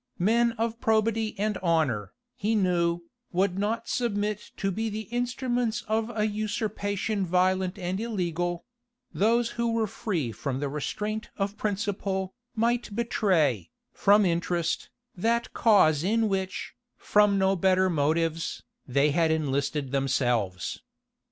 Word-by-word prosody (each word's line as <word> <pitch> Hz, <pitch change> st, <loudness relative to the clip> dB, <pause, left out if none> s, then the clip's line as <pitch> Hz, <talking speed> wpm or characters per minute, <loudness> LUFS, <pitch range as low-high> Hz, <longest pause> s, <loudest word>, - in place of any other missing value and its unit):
Men 230 Hz, +5 st, +3 dB
of 230 Hz, 0 st, -2 dB
probity 220 Hz, -1 st, +1 dB
and 210 Hz, 0 st, -1 dB
honor, 145 Hz, -, +1 dB, 0.2 s
he 225 Hz, -2 st, 0 dB
knew, 175 Hz, -3 st, +1 dB, 0.3 s
would 185 Hz, +1 st, +1 dB
not 215 Hz, +3 st, -1 dB
submit 210 Hz, -3 st, -1 dB
to 195 Hz, -1 st, 0 dB
be 220 Hz, +4 st, -2 dB
the 215 Hz, +1 st, -4 dB
instruments 245 Hz, -2 st, -1 dB
of 220 Hz, +1 st, 0 dB
a 210 Hz, -, +2 dB
usurpation 210 Hz, -1 st, -2 dB
violent 185 Hz, +1 st, +1 dB
and 185 Hz, 0 st, -3 dB
illegal: 175 Hz, -6 st, -2 dB, 0.5 s
those 230 Hz, +3 st, +2 dB
who 235 Hz, 0 st, -1 dB
were 225 Hz, -1 st, +1 dB
free 180 Hz, -, -2 dB
from 130 Hz, +3 st, -3 dB
the 145 Hz, 0 st, -2 dB
restraint 210 Hz, +9 st, -3 dB
of 200 Hz, 0 st, -1 dB
principle, 200 Hz, -2 st, -2 dB, 0.2 s
might 235 Hz, -1 st, 0 dB
betray, 170 Hz, -, +1 dB, 0.2 s
from 205 Hz, +1 st, +4 dB
interest, 170 Hz, -1 st, 0 dB, 0.3 s
that 230 Hz, +5 st, 0 dB
cause 155 Hz, -9 st, +4 dB
in 220 Hz, +4 st, +2 dB
which, 190 Hz, -2 st, -3 dB, 0.2 s
from 210 Hz, -1 st, +3 dB
no 190 Hz, 0 st, +3 dB
better 185 Hz, +1 st, +3 dB
motives, 165 Hz, 0 st, 0 dB, 0.2 s
they 140 Hz, +3 st, +3 dB
had 165 Hz, +2 st, +2 dB
enlisted 140 Hz, -2 st, -1 dB
themselves. 120 Hz, -, 0 dB
195 Hz, 125 wpm, -27 LUFS, 170-220 Hz, 0.5 s, from